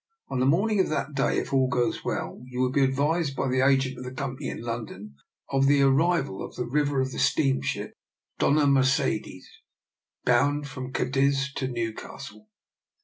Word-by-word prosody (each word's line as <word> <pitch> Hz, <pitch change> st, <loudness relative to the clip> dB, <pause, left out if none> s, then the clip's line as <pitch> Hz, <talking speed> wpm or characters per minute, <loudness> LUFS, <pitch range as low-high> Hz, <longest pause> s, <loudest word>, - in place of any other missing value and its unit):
On 130 Hz, -, -2 dB
the 130 Hz, -, +2 dB
morning 200 Hz, +8 st, +2 dB
of 190 Hz, -, +2 dB
that 155 Hz, 0 st, -2 dB
day, 135 Hz, 0 st, +1 dB
if -, -, -3 dB
all 130 Hz, -1 st, +3 dB
goes 125 Hz, -1 st, -1 dB
well, -, -, -4 dB
you 125 Hz, 0 st, -6 dB
will 130 Hz, 0 st, +2 dB
be 140 Hz, +1 st, +3 dB
advised 140 Hz, +3 st, +1 dB
by 135 Hz, -, -1 dB
the 130 Hz, 0 st, +1 dB
agent 130 Hz, -1 st, +2 dB
of -, -, -7 dB
the 125 Hz, -, -6 dB
Company 135 Hz, +1 st, -4 dB
in -, -, -6 dB
London 110 Hz, -6 st, -6 dB, 0.4 s
of 135 Hz, 0 st, +3 dB
the 140 Hz, 0 st, +4 dB
ar 135 Hz, -, +5 dB
rival 160 Hz, -, +1 dB
in -, -, -6 dB
the 125 Hz, -, -2 dB
river 145 Hz, +1 st, +1 dB
of 130 Hz, 0 st, -2 dB
the -, -, -5 dB
steamship 70 Hz, 0 st, 0 dB, 0.5 s
Dofia 145 Hz, 0 st, +3 dB
Mer 140 Hz, -1 st, +4 dB
cedes, 130 Hz, -, -1 dB, 0.8 s
bound 140 Hz, +4 st, +2 dB
from 130 Hz, -2 st, -7 dB
Cadiz 140 Hz, +1 st, +1 dB
to 130 Hz, -, -2 dB
Newcastle. 110 Hz, -3 st, -6 dB
135 Hz, 185 wpm, -26 LUFS, 125-140 Hz, 0.8 s, ar